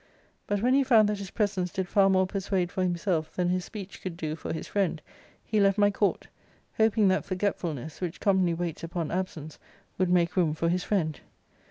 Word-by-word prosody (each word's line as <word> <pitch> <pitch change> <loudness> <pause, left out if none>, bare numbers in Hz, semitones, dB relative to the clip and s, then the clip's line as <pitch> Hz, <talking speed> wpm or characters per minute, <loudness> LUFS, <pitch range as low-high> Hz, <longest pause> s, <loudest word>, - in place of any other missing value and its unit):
But 205 0 -1
when 250 +1 +4
he 275 +1 +4
found 225 -5 +5
that 210 -1 -2
his 195 -2 -6
presence 195 -5 -1
did 190 -2 -2
far 195 +1 +4
more 190 0 +3
persuade 190 -2 -1
for 185 - -2
himself 175 -2 0
than 180 -1 +1
his 180 0 0
speech 200 -3 -9
could 180 -3 -5
do 155 -3 -3
for - - -6
his 160 - -4
friend, 190 -5 0 0.5
he 215 - 0
left 195 0 +4
my 205 0 +4
court; 200 0 0 0.5
hoping 220 -1 +4
that 185 - +1
forgetfulness, 170 -6 -3
which 175 -3 -4
commonly 190 -4 +2
waits 170 -2 -4
upon 165 -1 -3
absenoar 170 -4 -4 0.4
wQuld 185 - +3
make 175 -1 +2
room 165 -5 +2
for 165 +1 0
his 180 +1 0
friend. 160 -8 -1
185 Hz, 200 wpm, -28 LUFS, 170-200 Hz, 0.5 s, found